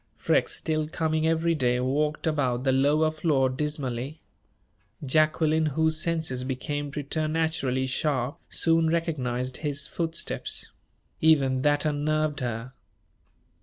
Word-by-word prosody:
Freke, - - +2
still 155 -1 -1
coming 160 0 0
every 165 +1 +2
day, 125 -5 +1
walked 150 +5 0
about 130 -6 0
the 135 - +2
lower 145 +4 +3
floor 155 -4 +1
dismally. 135 0 -3 0.9
Jacqueline, 155 +2 +2
whose 160 +2 +1
senses 160 -7 -1
became 145 +3 -3
preternaturally 155 -2 -1
sharp, 135 +2 -1
soon 165 -1 +3
recognized 130 -7 -1
his 145 -2 -2
footsteps. 165 0 -3 0.5
Even 135 -5 +4
that 145 +1 +2
unnerved 155 0 0
her. 120 0 -4
150 Hz, 110 wpm, -26 LUFS, 130-160 Hz, 0.9 s, Even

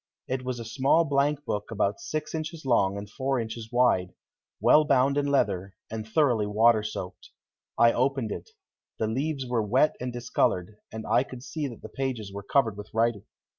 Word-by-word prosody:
It 130 0 -2
was 125 -1 -3
a 115 - -6
small 135 +8 +3
blankbook 140 -6 0
about 105 -2 0
six 155 0 -4
inches 155 -1 -5
long 100 -6 +2
and 100 +1 -6
four 130 +5 -1
inches 115 0 -6
wide, 120 -7 +2 0.4
well 155 - +6
bound 140 -1 +3
in 145 0 +1
leather 100 -9 0 0.2
and 110 -1 -5
thoroughly 115 -4 +2
water 110 +2 +4
soaked. 105 -4 -6 0.5
I 115 0 +6
opened 130 -2 0
it. - - -6 0.5
The 110 - 0
leaves 135 +5 -2
were 120 -2 0
wet 130 +8 +2
and 125 0 -3
discolored, 105 -5 -1
and 110 0 -6
I - - +3
could 125 -1 -8
see 150 0 -3
that 120 -4 -10
the - - -6
pages 125 -7 -4
were 100 - -5
covered 110 -1 +1
with 105 +1 -8
writing. 115 -3 +1
120 Hz, 180 wpm, -27 LUFS, 105-135 Hz, 0.5 s, well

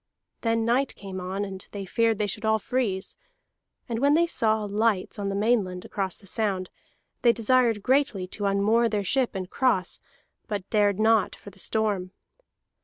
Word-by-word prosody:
Then 230 -1 +1
night 250 +4 +1
came 190 -2 -7
on, 190 +3 -3
and 190 -1 -8
they 200 -1 -6
feared 225 +3 +1
they 210 - 0
should 210 +2 -3
all 220 0 +3
freeze; 215 -4 -2 0.7
and 230 -1 -2
when 285 +3 +4
they 340 +1 +4
saw 220 -9 +1
lights 205 -1 0
on 200 -1 -2
the 195 - -2
mainland 200 -4 +1
across 190 -3 -3
the 200 - -14
sound, 195 -3 -1 0.5
they 240 - +6
desired 230 -2 +2
greatly 260 -7 +2
to 205 - -4
unmoor 210 +4 +3
their 205 -2 -1
ship 255 +2 0
and 185 -1 -3
cross, 220 -5 +1 0.5
but 200 -3 -4
dared 205 -2 +3
not 220 -1 +3
for 200 - -12
the 195 - -13
storm. 200 -3 -1
210 Hz, 175 wpm, -26 LUFS, 195-230 Hz, 0.7 s, they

